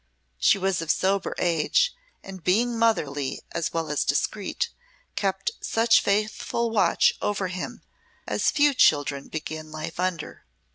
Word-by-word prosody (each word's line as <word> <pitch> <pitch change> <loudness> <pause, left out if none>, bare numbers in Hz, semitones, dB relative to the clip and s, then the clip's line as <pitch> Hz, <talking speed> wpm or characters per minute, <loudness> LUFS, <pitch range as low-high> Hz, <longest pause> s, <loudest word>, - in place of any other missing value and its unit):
She - - +4
was 190 -2 0
of 165 - -6
sober 195 +3 +1
age, 180 - +2 0.3
and 190 -3 -10
being 230 +6 +2
motherly 150 -12 0
as 170 - -2
well 165 -2 -2
as 150 - +1
discreet, 475 - -1 0.5
kept 195 -1 -1
such 225 0 +3
faithful 215 +3 -1
watch 215 -3 +3
over 200 -2 -1
him 185 0 -6 0.4
as - - +1
few 290 -1 +3
children 145 - +2
begin 155 0 -6
life 155 +2 -6
under. 180 - -3
190 Hz, 135 wpm, -25 LUFS, 160-225 Hz, 0.5 s, She